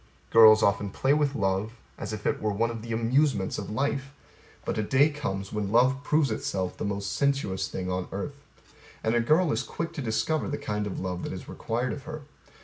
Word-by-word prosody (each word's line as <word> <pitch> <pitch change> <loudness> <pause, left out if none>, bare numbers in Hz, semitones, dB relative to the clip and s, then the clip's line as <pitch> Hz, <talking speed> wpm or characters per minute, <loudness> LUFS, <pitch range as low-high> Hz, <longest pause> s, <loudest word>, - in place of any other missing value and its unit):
Girls 110 -1 +8
often 100 0 +2
play 135 +7 +1
with 145 -1 +1
love 100 +1 0 0.2
as 105 - -6
if 105 -1 -6
it - - 0
were 110 - 0
one 115 +3 0
of 115 -1 -6
the 115 +1 -7
amusements 115 -1 +1
of 100 - -6
life; 135 +4 -1 0.5
but - - -1
a - - +3
day 135 +8 +3
comes 100 -10 -4
when 105 -2 -2
love 130 +4 +4
proves 150 -4 +2
itself 95 -4 -2
the - - -5
most 100 0 -2
sensuous 120 -9 0
thing 90 0 -4
on 90 0 -2
earth. 140 +8 -5 0.6
And 110 - +1
A 120 - +3
girl 155 +7 +3
is 110 - 0
quick 170 +4 -5
to 150 - -4
discover 125 +7 0
the 145 - -2
kind 105 0 -2
of 100 - -4
love 90 -1 -3
that - - -4
is - - -8
required 120 +3 -2
of 140 - -8
her. 155 -1 -7
115 Hz, 215 wpm, -27 LUFS, 100-140 Hz, 0.6 s, Girls